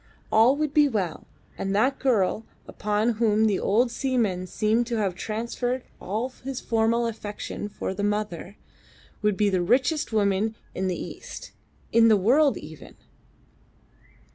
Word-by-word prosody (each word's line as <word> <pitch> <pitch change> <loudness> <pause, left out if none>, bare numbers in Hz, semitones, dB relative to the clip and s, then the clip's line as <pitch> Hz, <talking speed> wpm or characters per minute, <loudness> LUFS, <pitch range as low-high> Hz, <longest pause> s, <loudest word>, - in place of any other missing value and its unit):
All 230 +5 +5
would 300 -1 -1
be 295 -1 +5
well, 190 - -3 0.3
and 195 0 -1
that 255 +6 +2
girl, 220 -5 +1 0.2
upon 210 +2 0
whom 220 -1 +3
the 205 -3 +2
old 235 +4 +2
seaman 230 -8 0
seemed 220 +4 +1
to 240 - -2
have 200 -4 0
transferred 235 +6 -3 0.2
all 215 +6 -2 0.2
his 265 -1 -4
former 230 +1 +1
affection 210 -2 -5
for 190 - -4
the 205 - -4
mother, 205 -2 -2 0.6
would 210 -2 +1
be 205 0 +2
the 185 -1 +1
richest 260 - +1
woman 210 0 +1 0.2
in 190 +1 -2
the 180 - -2
East - - -8 0.4
in 230 0 +6
the 215 -2 +6
world 270 +9 +3
even. 150 -1 -11
220 Hz, 145 wpm, -25 LUFS, 200-240 Hz, 0.6 s, in